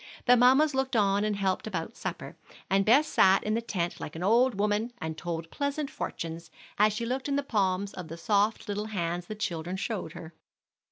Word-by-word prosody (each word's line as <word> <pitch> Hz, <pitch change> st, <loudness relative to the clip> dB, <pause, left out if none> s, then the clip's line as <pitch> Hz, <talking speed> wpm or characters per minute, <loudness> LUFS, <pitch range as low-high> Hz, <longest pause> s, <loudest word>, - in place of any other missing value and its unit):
The 245 Hz, -, +7 dB
mammas 265 Hz, +5 st, +5 dB
looked 265 Hz, -1 st, -1 dB
on 200 Hz, -1 st, +3 dB
and 210 Hz, -1 st, 0 dB
helped 195 Hz, 0 st, -1 dB
about 190 Hz, +2 st, -4 dB
supper, -, -, -6 dB, 0.4 s
and 195 Hz, 0 st, +3 dB
Bess 265 Hz, +8 st, +5 dB
sat 190 Hz, -9 st, +4 dB
in 215 Hz, -, -1 dB
the 230 Hz, -, 0 dB
tent 180 Hz, -7 st, -3 dB
like 150 Hz, -, -7 dB
an 165 Hz, -, -5 dB
old 235 Hz, +4 st, +4 dB
woman, 210 Hz, +3 st, 0 dB
and 160 Hz, -4 st, -4 dB
told 165 Hz, -1 st, -5 dB
pleasant 285 Hz, 0 st, -2 dB
fortunes, 165 Hz, 0 st, -5 dB, 0.3 s
as 210 Hz, +1 st, +5 dB
she 215 Hz, +3 st, -3 dB
looked 260 Hz, +3 st, -2 dB
in 280 Hz, -, +1 dB
the 285 Hz, -, 0 dB
palms 200 Hz, -5 st, 0 dB
of 180 Hz, -3 st, -7 dB
the 165 Hz, +1 st, -8 dB
soft 205 Hz, +5 st, +1 dB
little 205 Hz, +1 st, -2 dB
hands 175 Hz, -4 st, -3 dB
the 215 Hz, -, -5 dB
children 175 Hz, -3 st, -3 dB
showed 195 Hz, -5 st, -4 dB
her. 165 Hz, +1 st, -10 dB
205 Hz, 205 wpm, -28 LUFS, 175-235 Hz, 0.4 s, The